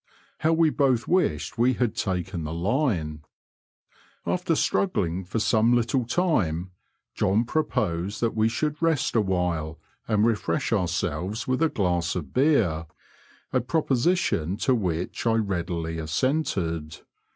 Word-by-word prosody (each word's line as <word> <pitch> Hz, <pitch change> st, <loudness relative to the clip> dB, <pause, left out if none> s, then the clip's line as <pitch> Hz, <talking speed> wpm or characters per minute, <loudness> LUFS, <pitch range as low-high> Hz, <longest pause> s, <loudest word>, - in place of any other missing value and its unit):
How 160 Hz, +1 st, +2 dB
we 165 Hz, -1 st, +4 dB
both 130 Hz, -6 st, +1 dB
wished 115 Hz, -, 0 dB
we 125 Hz, +2 st, +4 dB
had 120 Hz, -3 st, -1 dB
taken 90 Hz, -5 st, -2 dB
the 75 Hz, +2 st, -4 dB
line! 85 Hz, -, -1 dB, 1.0 s
After 180 Hz, -2 st, 0 dB
struggling 95 Hz, -, 0 dB
for 95 Hz, +5 st, -4 dB
some 115 Hz, +2 st, +3 dB
little 120 Hz, +1 st, +1 dB
time, 100 Hz, -, 0 dB, 0.4 s
John 105 Hz, +5 st, +1 dB
proposed 100 Hz, -, -1 dB
that 115 Hz, -1 st, +1 dB
we 110 Hz, 0 st, +3 dB
should 150 Hz, +6 st, -2 dB
rest 165 Hz, -7 st, +1 dB
awhile 90 Hz, -6 st, 0 dB, 0.3 s
and 105 Hz, -1 st, +2 dB
refresh 105 Hz, -5 st, 0 dB
ourselves 90 Hz, +2 st, -1 dB
with 130 Hz, +3 st, 0 dB
a 165 Hz, -, +4 dB
glass 90 Hz, -, 0 dB
of 80 Hz, -7 st, -5 dB
beer 110 Hz, -, +2 dB, 0.3 s
— -, -, -30 dB
a 130 Hz, -, +3 dB
pro 155 Hz, +6 st, 0 dB
position 130 Hz, -, +1 dB
to 130 Hz, -, +3 dB
which 90 Hz, -2 st, -2 dB
I 115 Hz, -, +4 dB
readily 85 Hz, -6 st, -2 dB
assented. 80 Hz, -, -1 dB
105 Hz, 135 wpm, -25 LUFS, 85-130 Hz, 1.0 s, we